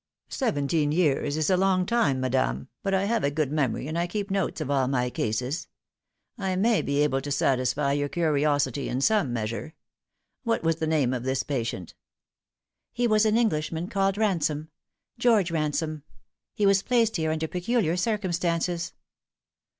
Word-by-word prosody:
" - - -52
Seventeen 150 - 0
years 150 -3 +1
is 155 +3 +1
a 185 - +4
long 185 -1 +2
time, 225 - +1
madame, 125 - -1
but 195 - -1
I 190 0 +2
have 230 +2 0
a 140 - +3
good 145 -1 -1
memory, 140 -3 -1
and 160 +2 -2
I 175 - 0
keep 200 +2 -4
notes 195 -4 -1
of 145 -3 -3
all 135 -2 +2
my 125 -2 0
cases. 125 +10 -2 0.7
I 190 -2 -1
may 220 +4 +3
be 140 +1 +1
able 135 -2 +1
to 145 - -6
satisfy 140 +1 +1
your 145 0 0
curiosity 145 -5 +1
in 130 - -1
some 205 - +2
measure. 115 +6 -4 0.7
What 230 -6 0
was 165 -1 +1
the 160 -1 -2
name 145 -5 +2
of 125 - -2
this 130 +1 -1
patient 115 - -3 0.3
?" - - -67
" - - -61
He 245 - -1
was 215 -1 +4
an 215 +1 +3
Englishman 170 -5 0
called 195 0 +1
Ransom 160 -7 0
e 235 - -30
George 215 -8 +3
Ransome. 155 -1 -1 0.5
He 210 - +1
was 195 -1 +4
placed 230 -3 +2
here 160 -1 0
under 160 0 -1
peculiar 180 0 0
circumstances." 175 -4 -1
160 Hz, 175 wpm, -26 LUFS, 140-195 Hz, 0.7 s, a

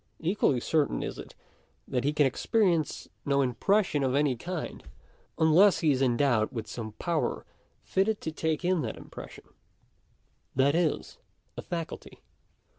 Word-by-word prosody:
Equally 165 -6 +1
certain 150 +4 0
is - - -5
it - - -10 0.5
that 125 -1 -1
he 145 - +2
can 150 -1 +3
experience 170 - +1 0.2
no 140 -1 +1
impres 195 - +2
sion 145 -5 -1
of 130 -1 +1
any 145 -2 +2
kind, 175 +7 -5 0.5
unless 170 +5 +5
he 155 -3 +4
is 135 -1 0
endowed 120 -3 +2
with 115 -4 -4
some 110 -3 -6
power 165 +7 -2 0.4
fitted 205 +3 +1
to 160 - -3
take 160 +1 -2
in 180 -2 +2
that 115 -5 -4
impression; - - -10 1.1
that 135 +2 +3
is, 165 -2 -1 0.4
a - - -5
faculty. 165 -2 -6
150 Hz, 145 wpm, -28 LUFS, 130-175 Hz, 1.1 s, unless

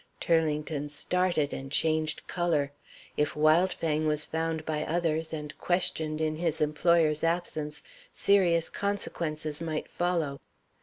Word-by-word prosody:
Turlington 150 -2 0
started 165 0 0
and 135 0 -6
changed 155 0 0
color. 160 -6 0 0.5
If 150 -1 +1
Wildfang 155 0 +2
was 150 0 +1
found 160 -1 -2
by 155 -1 -1
others, 160 -1 0
and 150 -2 -5
questioned 160 -4 0
in 155 0 0
his 165 -2 0
employer's 155 0 +3
absence, 165 -3 -2 0.3
serious 175 -5 +3
consequences 160 -6 -3
might 160 -2 -3
follow. 165 -6 -1
155 Hz, 115 wpm, -29 LUFS, 150-170 Hz, 0.5 s, employer's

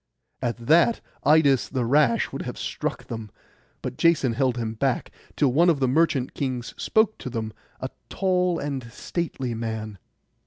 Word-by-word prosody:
At 120 -2 -1
that 170 - +5 0.2
Idas 140 -5 +4
the 130 -3 -1
rash 135 -1 +3
would - - -4
have - - -5
struck - - -3
them; 110 -2 -6 0.5
but 125 0 -5
Jason 155 -7 +3
held 130 0 +1
him 115 -2 -2
back, 130 +3 -1 0.2
till 140 -4 +2
one 170 +5 +5
of 160 -5 +2
the 130 - +2
merchant 135 -2 +2
kings 130 -4 -3
spoke 220 0 +2
to - - -5
them, 110 -3 -4 0.3
a 130 - -4 0.2
tall 180 -2 +1
and 135 -6 -4
stately 135 -4 -3
man. 110 -3 -4
130 Hz, 160 wpm, -25 LUFS, 115-160 Hz, 0.5 s, that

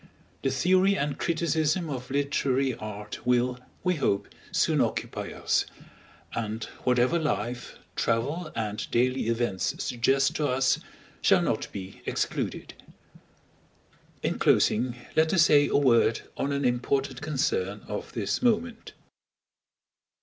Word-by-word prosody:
The 135 - +1
theory 185 +8 +3
and 145 -2 -2
criticism 165 0 +1
of 130 -4 -5
literary 135 -1 +1
art 105 -1 -7
will, 125 +1 +2 0.2
we 180 -2 +1
hope, 100 -8 0 0.2
soon - - +2
occupy - - -2
us; - - 0 0.7
and 110 -1 -3 0.2
whatever 125 +6 +3
life, 125 -6 -3 0.2
travel, 145 +9 -1
and 105 -1 -3
daily 125 0 +1
events 115 -5 0
suggest 135 +3 +2
to 150 - +1
us, 130 0 +2 0.4
shall - - +4
not - - -1
be 95 -1 -8
excluded. - - -2 1.5
In - - -1
closing, 120 +2 +3 0.2
let 160 +3 +3
us 170 - +6
say 145 -2 +5
a - - +2
word 115 -5 +4
on 140 - -1
an 140 -1 0
important 130 +2 0
concern 125 -9 -1
of 105 - -5
this 105 -4 -1
moment. 235 -1 0
130 Hz, 120 wpm, -27 LUFS, 115-150 Hz, 1.5 s, us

